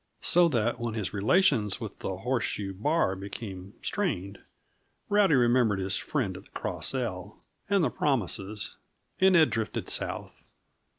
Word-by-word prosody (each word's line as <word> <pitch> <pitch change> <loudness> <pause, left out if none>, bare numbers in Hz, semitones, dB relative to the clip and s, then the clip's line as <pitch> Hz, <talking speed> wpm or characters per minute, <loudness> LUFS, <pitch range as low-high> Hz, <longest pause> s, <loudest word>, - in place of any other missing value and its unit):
So 175 0 +6
that, 120 -4 0
when 115 -2 -3
his 105 -4 -3
relations 105 - +2
with 110 -4 -7
the 95 - -4
Horseshoe 110 -3 -2
Bar 110 - +1
became 95 0 -8
strained, 100 - -2 0.7
Rowdy 205 -6 +4
remembered 120 -4 +3
his 95 0 -1
friend 115 -11 -2
of - - -10
the - - -23
Cross - - -2
L 100 -6 -4 0.3
and 200 -3 +3
the - - +1
promises, 105 - -1 0.4
and 190 0 +5
had 160 -2 +5
drifted 110 -2 -3
south. - - -4
115 Hz, 140 wpm, -28 LUFS, 95-145 Hz, 0.7 s, So